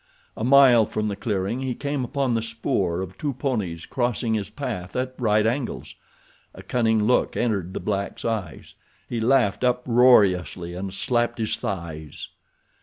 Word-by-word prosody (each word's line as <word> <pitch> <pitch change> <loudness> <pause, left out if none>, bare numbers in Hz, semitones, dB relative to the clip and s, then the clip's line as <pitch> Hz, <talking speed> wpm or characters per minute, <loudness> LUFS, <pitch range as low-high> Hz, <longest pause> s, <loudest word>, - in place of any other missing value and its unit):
A - - -5
mile 130 -4 +6
from 105 0 -2
the 100 - -3
clearing 105 +3 -2
he 130 -2 -2
came 140 -2 -2
upon 135 0 -1
the 115 - +1
spoor 105 -6 -1
of 95 0 -8
two 145 -2 -2
ponies 105 - -3
crossing 120 -2 -1
his 105 -3 -2
path 115 -11 -5
at 130 0 -2
right 110 -3 +2
angles. 125 +3 -2 0.6
A - - -11
cunning 110 -3 +1
look 125 +4 +2
entered 100 -6 -1
the - - -2
black's 100 -1 -3
eyes. 105 -9 -4 0.3
He 115 -2 -3
laughed 120 -3 +2
uproariously 115 -8 +3
and 95 +2 -5
slapped 120 +4 0
his 110 -2 -1
thighs. 80 -5 -6
115 Hz, 155 wpm, -24 LUFS, 95-125 Hz, 0.6 s, mile